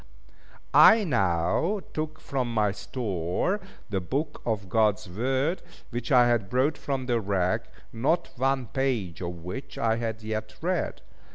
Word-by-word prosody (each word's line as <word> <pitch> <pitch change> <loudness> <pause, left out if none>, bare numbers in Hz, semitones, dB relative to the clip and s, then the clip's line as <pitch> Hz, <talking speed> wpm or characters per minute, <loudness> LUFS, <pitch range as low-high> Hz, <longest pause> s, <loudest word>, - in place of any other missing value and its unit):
I 220 -1 +8
now 100 - +1
took 155 0 -3
from 130 -4 -2
my 105 -3 +2
store 100 - -2 0.3
the 95 -2 0
Book 145 - -3
of 105 -4 -1
God's 105 +1 +2
Word, 130 - 0 0.3
which 120 +2 -4
I 125 -2 +7
had 115 -5 +1
brought 135 +6 +2
from 135 -2 -3
the 120 -2 +1
wreck, 95 -3 0 0.3
not 140 +9 +1
one 135 0 +1
page, 115 - -1
of 85 -1 -5
which 130 +10 -6
I 115 0 +2
had 115 -1 -3
yet 110 0 -4
read. 180 +1 -2
120 Hz, 145 wpm, -27 LUFS, 100-135 Hz, 0.3 s, I